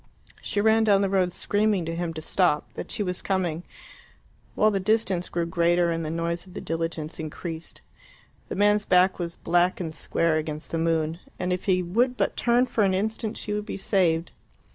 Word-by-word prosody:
She 205 - -2
ran 220 +1 +4
down 200 -2 +4
the 195 - 0
road 185 -2 +2
screaming 205 -1 +1
to 165 - -3
him 170 -1 -2
to 155 - -5
stop 175 -5 +1
that - - -7
she 210 - -2
was 180 -2 -2
coming; 180 -4 -1 0.9
while 215 0 +4
the 195 - 0
distance 195 -3 0
grew 170 -1 -1
greater 170 +1 +2
and 165 0 -2
the 155 - -3
noise 170 +2 -2
of 180 - -15
the - - -4
diligence 165 -1 -4
increased. 160 +1 -6 0.7
The - - -4
man's 205 +1 +3
back 185 -1 +3
was 170 -1 -3
black 175 +2 +1
and 165 -3 -4
square 165 0 0
against 155 0 -5
the 165 - -1
moon, 165 0 0 0.2
and 180 0 -1
if 180 - -4
he 185 -2 +2
would 240 +8 +1
but 200 - 0
turn 240 +1 +3
for 225 -4 0
an 190 -1 +2
instant 215 +2 -2
she 210 - -3
would 210 0 -3
be - - -4
saved. 175 -4 +1
180 Hz, 200 wpm, -25 LUFS, 165-205 Hz, 0.9 s, ran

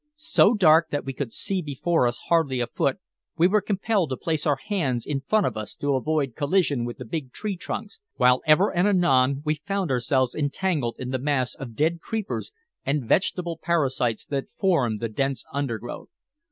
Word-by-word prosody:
So 240 -7 +4
dark 165 -4 +5
that 145 - -2
we 135 - -4
could 130 -2 -4
see 190 - -2
before 150 -1 +1
us 120 0 -3
hardly 160 -7 +2
a 120 - +1
foot, 120 - -1 0.4
we 165 - +4
were 210 +2 +3
compelled 200 -4 0
to 130 - -3
place 160 -2 -1
our 145 - +3
hands 135 - -2
in 140 -2 -2
front 210 +8 +2
of - - -1
us 110 -1 -5
to 145 0 -1
avoid 140 -1 0
collision 145 -5 +1
with 120 - -6
the 125 - -8
big 135 +1 -5
tree 210 - -4
trunks, 440 - -6 0.2
while 125 0 +4
ever 170 +7 +4
and 175 +3 +3
anon 140 -8 +3
we 155 - +2
found 195 +1 -3
ourselves 130 0 +1
entangled 145 -3 -1
in 130 0 -5
the 130 - -1
mass 130 -2 0
of 120 -4 -9
dead 160 +5 +1
creepers 220 0 -4 0.3
and 140 -2 -1
vegetable 175 - 0
parasites 135 -9 0
that 140 -2 -3
formed 130 - +1
the 115 - 0
dense 135 +4 -2
undergrowth. 120 -4 -4
145 Hz, 190 wpm, -25 LUFS, 130-175 Hz, 0.4 s, dark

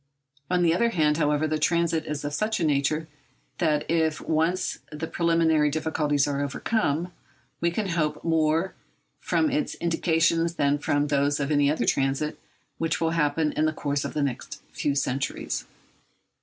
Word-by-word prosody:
On 180 -1 +2
the 165 -1 +4
other 235 +7 +2
hand, 150 -7 +2
however, 150 -1 +1
the 155 0 -1
transit 165 +1 +1
is 150 -1 -4
of 145 - -3
such 215 +7 0
a - - 0
nature 150 +1 +1 0.5
that 150 -3 +1
if 160 -2 +1
once 165 +3 0
the 150 +1 -4
preliminary 165 -3 +2
difficulties 150 -2 0
are 140 -1 -1
overcome, 170 +2 -1 0.5
we 170 - +2
can 195 +3 -2
hope 155 -3 -1
more 160 +2 +1 0.5
from 310 -2 +1
its 295 +1 -1
indications 165 0 +1
than 145 -1 +1
from 145 0 +1
those 145 0 +1
of 140 +1 -1
any 145 -1 +3
other 145 -5 0
transit 135 +4 0 0.4
which 165 0 0
will 165 -1 +1
happen 155 -1 +1
in 155 - 0
the 155 - +1
course 145 -2 -2
of - - -5
the 150 - +1
next 135 -3 -4
few 145 -1 -1
centuries. 135 -1 -2
155 Hz, 165 wpm, -26 LUFS, 145-165 Hz, 0.5 s, the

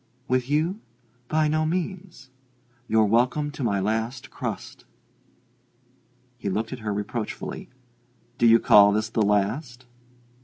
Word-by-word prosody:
"With 130 0 0
you? 160 +7 0 0.5
By 155 +2 +2
no 155 +1 +1
means. 170 -4 -4 0.6
You're 110 0 +3
welcome 125 +7 +1
to 145 -2 -6
my 100 -4 +1
last 110 +5 -2
crust." - - -6 1.5
He 100 - -3
looked 110 +5 -2
at 130 - -7
her 110 -1 -3
reproachfully. 105 +2 -5 0.7
"Do 120 - +5
you 115 0 +7
call 105 -2 +6
this 110 +1 -1
the 115 - -1
last?" 115 +6 0
120 Hz, 125 wpm, -25 LUFS, 110-150 Hz, 1.5 s, you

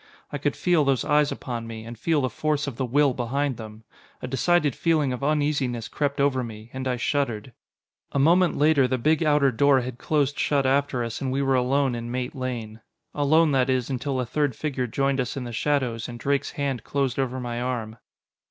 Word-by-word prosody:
I - - -4
could - - -1
feel 175 -4 +2
those 135 -3 +1
eyes 150 -1 +3
upon 120 -3 -5
me, 110 -1 -7
and 115 +1 -8
feel 150 +6 +1
the 130 - 0
force 150 -1 -1
of 140 -4 -5
the 130 +1 -2
will 140 +2 +3
behind 130 +2 -1
them. 110 -1 -10 0.4
A - - -5
decided 145 +2 +2
feeling 155 -6 +1
of 125 - -6
uneasiness 145 -5 0
crept 140 -1 -2
over 135 -2 +2
me, 110 0 -9
and 130 0 -4
I 125 -1 0
shuddered. 125 -3 -1 0.6
A - - -2
moment 170 +6 +4
later 145 -3 +4
the 130 +1 0
big 155 +6 +2
outer 150 -3 +3
door 135 +2 +4
had 125 0 -6
closed 145 -2 0
shut 140 -2 +1
after 135 -2 +1
us, 115 -1 -5
and 130 -2 -1
we 140 +1 0
were 135 0 +2
alone 130 +1 +2
in 120 0 -5
Mate 125 +1 -3
Lane. 120 -5 -5 0.3
Alone, 155 +2 +3
that 135 -1 +2
is, 130 0 0
until 130 +1 -2
a 125 - -1
third 140 +1 -1
figure 130 -3 -2
joined 135 +3 0
us 125 +2 -2
in 130 - -3
the 120 -1 -6
shadows, 125 -3 -1
and 120 0 -8
Drake's 140 +1 -1
hand 140 -4 -2
closed 135 -2 -1
over 130 -1 -1
my 120 -1 -4
arm. 120 -3 -3
135 Hz, 210 wpm, -25 LUFS, 120-145 Hz, 0.6 s, moment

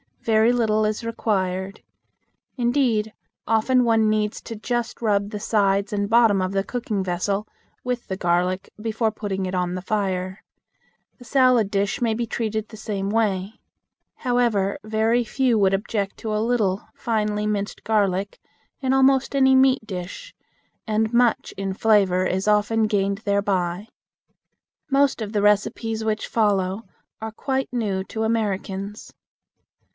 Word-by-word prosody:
Very 225 +1 +4
little 215 -3 +2
is 215 +2 -2
required. 195 -4 -2 0.7
Indeed, 240 -4 +1 0.3
often 235 +3 +3
one 225 -2 +3
needs 215 0 0
to 230 - -7
just 240 +2 -3
rub 205 -3 +1
the 210 -1 -5
sides 200 -1 +1
and 200 0 -1
bottom 225 -4 +4
of 185 0 -1
the 195 0 0
cooking 220 -4 -3
vessel 195 +3 -1 0.4
with 250 -1 -3
the 190 - -3
garlic 180 +2 0
before 225 0 -1
putting 195 -3 -3
it 185 0 -3
on 180 -1 -1
the 185 - -4
fire. 190 -1 -2 0.7
The 245 - -14
salad 255 -5 +3
dish 200 +2 0
may 230 -2 +2
be 235 +2 -2
treated 220 -1 -2
the 220 - -11
same 200 -3 -3
way. 205 -2 -1 0.6
However, 235 -6 0
very 220 +3 +1
few 245 0 +1
would 195 -1 +3
object 200 0 -2
to 215 -1 -3
a - - +1
little 220 -5 0
finely 210 -2 -1
minced 205 -1 -3
garlic 200 -2 0 0.4
in 265 -1 0
almost 270 +1 +3
any 265 -1 +5
meat 260 -2 +4
dish, 195 - -7 0.5
and 220 +1 0
much 240 -1 +2
in 195 -1 -2
flavor 195 -3 +3
is 190 +2 -1
often 210 +1 +3
gained 200 -1 0
thereby. 200 -2 -1 1.0
Most 275 -3 +2
of 210 -2 -4
the 205 - +1
recipes 220 +2 +1
which 215 0 -1
follow 200 -2 +1 0.4
are 220 0 -4
quite 265 +4 -2
new 205 -6 -1
to 220 +2 -4
Americans. 205 -2 -2
215 Hz, 145 wpm, -23 LUFS, 195-230 Hz, 1.0 s, any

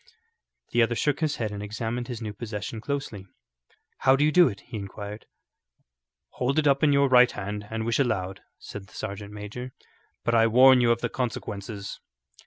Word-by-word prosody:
The 120 - +3
other 115 +1 +2
shook 145 +4 0
his 155 -2 0
head 110 -3 -3
and 100 0 -5
examined 115 +3 -4
his 120 -2 -6
new 105 -1 -4
possession 110 0 -6
closely. 125 -8 -4 0.7
"How 130 0 +5
do 145 +2 +3
you 155 - +3
do 175 +1 +6
it?" 100 -5 -5
he 120 - -10
inquired. 100 +1 -7 1.0
"Hold 130 +3 -1
it 155 - +3
up 140 -1 +4
in 150 - +4
your 140 0 +4
right 125 -1 +6
hand 105 +1 -5
and 110 0 -3
wish 115 +3 0
aloud," 95 -8 -1 0.2
said 100 -1 -9
the - - -18
sergeant 100 +1 -6
major, 105 +5 -7 0.5
"but 120 - 0
I 115 -1 +5
warn 130 +2 +7
you 120 -1 +4
of 115 - 0
the - - -1
consequences." 105 -4 -5
115 Hz, 190 wpm, -26 LUFS, 105-130 Hz, 1.0 s, warn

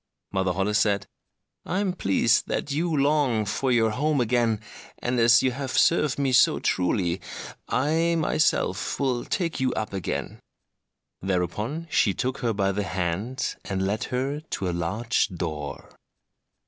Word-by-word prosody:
Mother 95 -1 0
Holle 95 +3 0
said, 100 -2 +2 0.6
"I 180 - -2
am 195 -2 0
pleased 115 - +2
that 145 - -2
you 165 +5 0
long 140 -6 +2
for 130 +6 -1
your 115 -2 +3
home 145 +5 +1
again, 120 -2 +2 0.4
and 120 0 -1
as 115 0 +6
you 130 - +2
have 135 0 -3
served 150 -4 +3
me 140 -2 +1
so 130 +1 +5
truly, 90 0 0 0.5
I 160 +5 +1
myself 155 -1 +1
will 130 -4 0
take 170 -5 -2
you 130 -1 +1
up 110 -2 -3
again." 95 -5 -4 0.8
Thereupon 100 - -2
she 100 - +3
took 130 +1 -2
her 120 -3 0
by 100 -2 +1
the 100 +1 -1
hand, 95 +7 -2
and 95 -1 -2
led 105 +3 -1
her 135 +4 -2
to 150 -11 -4
a 90 - -1
large 105 +8 0
door. 80 -6 -6
115 Hz, 150 wpm, -25 LUFS, 95-140 Hz, 0.8 s, as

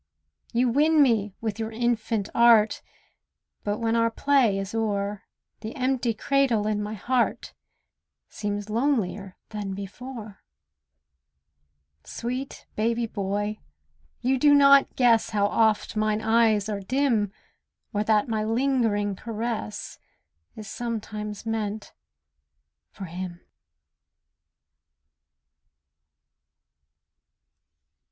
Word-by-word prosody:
You 245 +2 +2
win 300 +6 +3
me 210 -6 +1
with 220 -1 -3
your 220 0 -3
infant 225 -2 -1
art; 230 -2 +5 0.8
But 205 0 -1
when 225 0 0
our 230 0 +3
play 245 -4 +2
is 195 +1 -4
o'er, 205 -2 -1 0.4
The 220 +4 -7
empty 255 -3 0
cradle 260 -4 +1
in 210 -1 0
my 210 +1 -4
heart 240 +4 -1 0.7
Seems 205 -1 -4
lonelier 215 -5 -1
than 205 -3 -4
before. 215 +2 -8 1.6
Sweet 255 +3 -5
baby 230 +2 0
boy, 205 0 -3 0.6
you 260 +1 +1
do 290 +1 +6
not 280 -1 +6
guess 235 -3 +4
How 205 -2 +1
oft 220 +1 +1
mine 215 0 0
eyes 220 -2 +3
are 210 -2 -3
dim, 230 -2 +1 0.6
Or 205 0 +1
that 215 0 +2
my 220 -2 -1
lingering 225 -4 +1
caress 225 - -5 0.6
Is 215 -1 -9
sometimes 215 -2 -5
meant 220 -1 -3 1.0
for 195 - -8
him. 175 0 -6
220 Hz, 100 wpm, -26 LUFS, 205-240 Hz, 1.6 s, do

